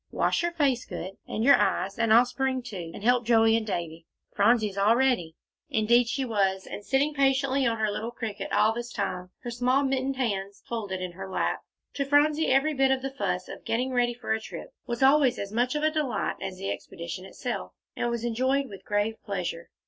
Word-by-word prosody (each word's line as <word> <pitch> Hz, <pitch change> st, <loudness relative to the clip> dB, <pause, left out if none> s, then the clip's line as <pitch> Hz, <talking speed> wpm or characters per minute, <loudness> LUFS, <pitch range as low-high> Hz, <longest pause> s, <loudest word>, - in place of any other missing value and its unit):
Wash -, -, +1 dB
your 345 Hz, 0 st, 0 dB
face 280 Hz, -7 st, +1 dB
good, 180 Hz, 0 st, -6 dB, 0.2 s
and 220 Hz, -, -2 dB
your 280 Hz, +3 st, +7 dB
eyes, 195 Hz, +4 st, 0 dB
and 230 Hz, -1 st, +2 dB
I'll 235 Hz, +3 st, +7 dB
spring 260 Hz, 0 st, -2 dB
to, 185 Hz, -9 st, -7 dB
and 200 Hz, -, -10 dB
help 245 Hz, +1 st, +3 dB
Joey 225 Hz, -1 st, +4 dB
and 225 Hz, -1 st, -1 dB
Davie. 170 Hz, -3 st, -4 dB, 0.3 s
Phronsie's 210 Hz, -1 st, +3 dB
all 205 Hz, +3 st, +4 dB
ready." 240 Hz, -11 st, +1 dB, 0.3 s
Indeed, 235 Hz, +2 st, +3 dB
she 265 Hz, +2 st, -1 dB
was, 195 Hz, -4 st, 0 dB
and 205 Hz, -, -7 dB
sitting 275 Hz, +6 st, +1 dB
patiently 270 Hz, -1 st, +2 dB
on 230 Hz, -1 st, 0 dB
her 215 Hz, -1 st, 0 dB
little 220 Hz, +3 st, -3 dB
cricket 225 Hz, -3 st, -5 dB
all 220 Hz, -, +3 dB
this 240 Hz, +1 st, -5 dB
time, 185 Hz, -4 st, -3 dB
her 240 Hz, -, -4 dB
small 250 Hz, +3 st, +2 dB
mittened 270 Hz, 0 st, 0 dB
hands 200 Hz, -6 st, -3 dB
folded 205 Hz, -5 st, -4 dB
in 180 Hz, -, -4 dB
her 190 Hz, +2 st, -8 dB
lap. -, -, -1 dB, 0.3 s
To 280 Hz, -, -1 dB
Phronsie, 295 Hz, +2 st, +3 dB
every 275 Hz, +4 st, +3 dB
bit 270 Hz, -1 st, +3 dB
of 265 Hz, -1 st, +1 dB
the 270 Hz, 0 st, -4 dB
fuss 185 Hz, -7 st, -2 dB
of -, -, -9 dB
getting 250 Hz, +3 st, -1 dB
ready 240 Hz, -1 st, +1 dB
for 240 Hz, -, -2 dB
a 220 Hz, -, -2 dB
trip -, -, -9 dB
was 235 Hz, +1 st, -1 dB
always 270 Hz, -2 st, +5 dB
as 200 Hz, 0 st, -5 dB
much 245 Hz, +5 st, 0 dB
of 300 Hz, -, -1 dB
a 310 Hz, -, +3 dB
delight 305 Hz, -5 st, -1 dB
as 185 Hz, -1 st, -5 dB
the 195 Hz, +1 st, -3 dB
expedition 170 Hz, +2 st, -6 dB
itself, 190 Hz, -, -5 dB, 0.2 s
and 240 Hz, -, -1 dB
was 235 Hz, -1 st, -3 dB
enjoyed 260 Hz, +3 st, 0 dB
with 195 Hz, -2 st, -10 dB
grave 205 Hz, +2 st, 0 dB
pleasure. 175 Hz, -4 st, -4 dB
235 Hz, 210 wpm, -27 LUFS, 200-265 Hz, 0.3 s, your